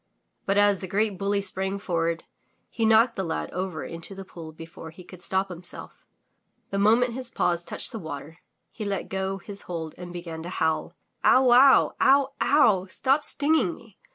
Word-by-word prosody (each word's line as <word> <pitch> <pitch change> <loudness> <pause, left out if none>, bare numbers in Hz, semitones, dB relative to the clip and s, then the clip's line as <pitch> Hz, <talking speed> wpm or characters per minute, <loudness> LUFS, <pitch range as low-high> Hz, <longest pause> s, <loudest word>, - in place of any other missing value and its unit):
But 195 +1 +2
as 205 -2 +4
the 190 - -6
great 205 0 0
bully 200 0 0
sprang 190 0 0
forward, 170 -4 -2 0.5
he 225 -2 0
knocked 225 +2 +5
the 190 - -2
lad 160 -2 -3
over 185 -3 -4
into 165 +4 -6
the 195 0 -8
pool 165 -4 -10
before 165 +1 -10
he 170 +3 -13
could 180 0 -13
stop 190 +2 -1
himself. 175 -1 -7 0.6
The 195 - -1
moment 230 +4 +3
his 255 0 -4
paws 175 -6 0
touched - - -1
the 225 - -6
water, 160 -1 -8 0.3
he 220 - -7
let 200 -1 -3
go 190 0 -2
his 200 0 -8
hold 160 -3 -4
and 175 -1 -8
began 170 -2 -7
to 170 - -7
howl. 160 -3 -1 0.3
"Ow 260 - +6
wow! 260 +2 +6
Ow! 275 0 +4
Ow! 215 -11 +4
Stop 270 +9 +1
stinging 290 - +1
me! 225 -4 -19
195 Hz, 180 wpm, -26 LUFS, 170-220 Hz, 0.6 s, Ow